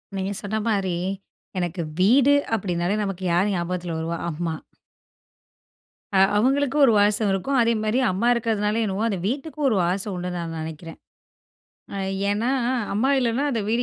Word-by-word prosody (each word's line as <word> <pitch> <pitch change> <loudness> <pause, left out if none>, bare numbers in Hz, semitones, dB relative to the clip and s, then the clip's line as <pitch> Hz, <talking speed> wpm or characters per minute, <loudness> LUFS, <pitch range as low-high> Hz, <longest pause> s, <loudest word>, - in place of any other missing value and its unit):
நீங்க 190 +1 -2
சொன்ன 210 +1 -3
மாதிரி 195 -4 0 0.6
எனக்கு 175 0 -2 0.2
வீடு 255 +9 +5 0.2
அப்பிடினாலே 180 -2 0
நமக்கு 195 -2 -4
யார் 190 +4 +2
ஞாபகத்தில் 175 -1 -3
வருவா? 165 +1 -3
அம்மா. 165 0 -3 1.6
அ - - +3 0.2
அவங்களுக்கும் 275 +5 +2
ஒரு 235 - +4
வாசம் 205 +1 +3
இருக்கும். 265 +9 0
அதே 230 0 +3
மாதிரி 215 +4 +1
அம்மா 195 +6 0
இருக்கறதுனால 220 -2 0
என்னமோ, 200 +1 -2
அந்த 195 -4 -2
வீட்டுக்கும் 290 +4 -2
ஒரு 225 - +1
வாசம் 190 +4 -1
உண்டுன்னு 180 0 -4
நான் 165 -1 -5
நெனைக்கிறேன். 160 +1 -8 1.3
ஏன்னா, 215 +5 0 0.4
அம்மா 220 +7 +1
இல்லனா 245 +1 0
அந்த 235 -4 -1
வீடு 235 +2 +1
205 Hz, 145 wpm, -23 LUFS, 180-230 Hz, 1.6 s, வீடு